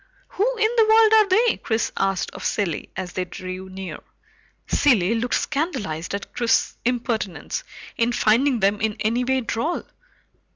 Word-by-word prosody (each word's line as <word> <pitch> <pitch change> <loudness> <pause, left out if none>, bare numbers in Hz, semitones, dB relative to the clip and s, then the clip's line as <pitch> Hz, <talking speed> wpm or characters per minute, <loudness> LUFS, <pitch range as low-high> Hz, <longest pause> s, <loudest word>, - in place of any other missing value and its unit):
"Who - - 0
in 440 0 +2
the 445 -1 +5
world 440 0 +6
are 435 -2 +6
they?" 445 +5 +3
Chris 220 0 -1
asked 195 -1 -1
of 185 - -9
Cilley 190 -7 -2
as 185 -1 -5
they 185 - -1
drew 185 +1 -7
near. 190 0 -7 0.7
Cilley 225 -8 +3
looked 235 +2 0
scandalized 230 - -2
at 200 - -7
Chris's 235 -2 +1
impertinence 230 -9 -2 0.3
in 235 0 +2
finding 240 +2 +2
them 200 +1 +2
in 220 -1 0
any 230 +3 +1
way 260 +1 +1
droll. 240 +8 -2
230 Hz, 155 wpm, -23 LUFS, 195-285 Hz, 0.7 s, world